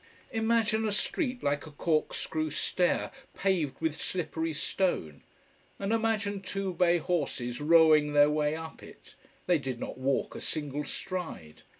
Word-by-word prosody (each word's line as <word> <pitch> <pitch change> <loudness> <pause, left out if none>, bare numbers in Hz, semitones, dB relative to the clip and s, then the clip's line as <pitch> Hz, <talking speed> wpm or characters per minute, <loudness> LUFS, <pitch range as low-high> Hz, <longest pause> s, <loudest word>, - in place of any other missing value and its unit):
Imagine 225 -1 +2
a - - 0
street 250 - -1
like 145 +2 0
a - - -10
corkscrew 155 0 -1
stair, 175 +4 0 0.2
paved 180 -8 0
with 160 -1 -2
slippery 165 -2 -2
stone. 150 - -1 0.6
And 200 +2 -1
imagine 215 -3 0
two 195 -1 -3
bay 175 0 +4
horses 145 -7 -2
rowing 155 -1 +6
their 145 0 +6
way 150 0 +1
up 160 0 -8
it: - - -14 0.3
they 175 -3 +3
did 130 -3 -4
not - - -6
walk 135 +1 0
a - - -7
single 150 -1 -3
stride. 165 - -6
160 Hz, 140 wpm, -30 LUFS, 150-195 Hz, 0.6 s, rowing